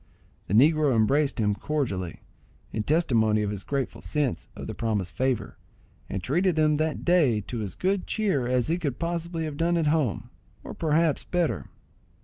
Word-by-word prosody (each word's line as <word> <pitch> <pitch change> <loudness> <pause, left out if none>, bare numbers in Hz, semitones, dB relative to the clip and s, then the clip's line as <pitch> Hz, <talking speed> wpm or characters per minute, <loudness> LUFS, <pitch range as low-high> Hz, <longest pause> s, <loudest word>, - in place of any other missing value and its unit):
The 100 - 0
negro 150 +1 +5
embraced 135 +6 +2
him 105 -2 +2
cordially, 100 - -3 0.5
in 110 - -1
testimony 110 -7 +2
of 105 - -1
his 100 -2 -5
grateful 140 +3 -3
sense 145 - -2
of - - -7
the - - -5
promised 105 -6 -2
favour, 130 -2 -2 0.5
and 95 -2 -4
treated 175 - +1
him 155 -1 +3
that 155 0 -2
day 155 -11 +4
to 115 +2 -5
as 100 -3 -5
good 190 0 0
cheer 190 - 0
as 125 -1 +1
he 170 +2 0
could 145 -8 -2
possibly 170 0 -2
have 150 -2 -5
had 170 +1 +2
at 165 - +1
home, 120 -6 -1 0.3
or - - -7
perhaps 160 -1 +1
better. 175 -3 -1
145 Hz, 170 wpm, -26 LUFS, 110-165 Hz, 0.5 s, negro